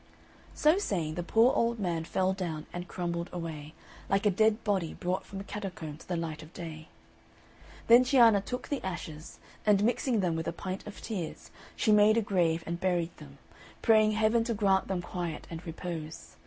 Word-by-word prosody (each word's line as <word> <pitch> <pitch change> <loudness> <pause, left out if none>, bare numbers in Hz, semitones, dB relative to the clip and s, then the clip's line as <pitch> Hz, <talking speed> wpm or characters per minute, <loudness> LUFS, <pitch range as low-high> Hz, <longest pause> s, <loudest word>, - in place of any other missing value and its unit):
So 310 +5 +4
saying, 170 - -1
the 175 - -3
poor 225 +8 +4
old 235 0 +1
man 170 -5 -2
fell 185 +2 +1
down 165 -5 -4
and 175 0 -5
crumbled 170 -1 -3
away, 160 -3 -6 0.3
like 195 +2 +1
a 205 - +5
dead 215 +3 +2
body 190 -6 0
brought 180 +1 -2
from 195 - -7
a - - -5
catacomb 180 -8 -6
to - - -15
the 180 - -1
light 160 -2 -4
of 155 - -13
day. 160 -2 -8 1.0
Then 235 +2 +8
Cianna 235 -6 +5
took 250 +5 -5
the 285 - -2
ashes, 160 -4 -6 0.3
and 205 -1 +4
mixing 240 0 +1
them 175 -3 0
with 160 0 -3
a 170 - -1
pint 185 +4 -6
of 210 - -9
tears, 185 -8 -5 0.2
she 220 - +2
made 210 +1 +6
a - - +4
grave 170 -5 +1
and 170 +1 -3
buried 175 -2 0
them, - - -13 0.5
praying 215 -2 +5
Heaven 220 +2 +3
to 230 -2 -1
grant 195 -2 +2
them 185 -2 -2
quiet 175 -3 -4
and 165 +1 -6
repose. 165 -1 -6
185 Hz, 190 wpm, -30 LUFS, 165-215 Hz, 1.0 s, Then